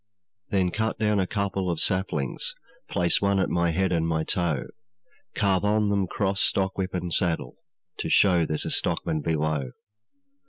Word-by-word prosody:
'Then 95 -3 +1
cut 110 +3 -1
down 105 -1 +1
a 95 - +1
couple 100 -2 -1
of 85 -2 -1
saplings, 95 - -1 0.3
Place 85 -1 +2
one 100 0 +2
at 95 - 0
my 85 0 +2
head 95 +3 0
and 80 -2 +1
my 80 -1 0
toe, 80 -6 0 0.7
Carve 100 -2 +2
on 105 0 +2
them 100 -2 +1
cross, 95 +1 -1
stockwhip, 95 -1 0
and 90 -1 -3
saddle, 85 -2 -1 0.4
To - - -2
show 90 -4 +4
there's 80 -1 -1
a - - -2
stockman 80 -1 0
below. 75 -4 -1
90 Hz, 160 wpm, -26 LUFS, 80-100 Hz, 0.7 s, show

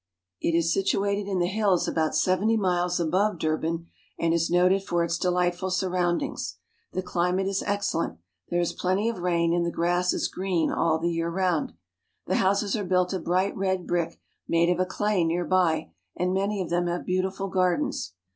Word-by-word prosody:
It 165 - +1
is 170 0 +2
situated 200 +1 0
in 190 - 0
the 175 - +2
hills 195 -1 +1
about 160 -1 0
seventy 205 +5 +2
miles 180 -3 +1
above 185 +4 +1
Durban, 160 +1 -1 0.3
and 165 0 +1
is 165 0 +1
noted 180 +2 +4
for 175 -3 0
its 170 0 0
delightful 180 +1 0
surroundings. 180 -2 -1 0.4
The 185 - -2
climate 180 +1 0
is 195 0 -1
ex 205 0 0
cellent; 165 - -2 0.3
there 175 - 0
is 175 - 0
plenty 190 +5 0
of 230 -5 -4
rain, 170 -1 +1
and 175 0 +2
the 170 - 0
grass 175 +2 +1
is - - 0
green 185 -3 -1
all 160 -1 +2
the 170 +2 -1
year 165 0 -1
round. 180 -2 0 0.5
The 185 - 0
houses 200 +2 +2
are 210 - -2
built 180 0 +1
of 185 -3 -3
bright 185 +3 +1
red 190 -2 -1
brick 170 -2 -1 0.3
made 170 +1 +3
of 180 - 0
a 185 - +1
clay 205 -2 0
near 170 +2 0
by, 170 - +1 0.2
and 180 +1 0
many 200 +1 0
of 175 - -5
them 175 0 +1
have 175 +1 -2
beautiful 190 +1 -1
gardens. 185 - 0
180 Hz, 190 wpm, -26 LUFS, 170-190 Hz, 0.5 s, noted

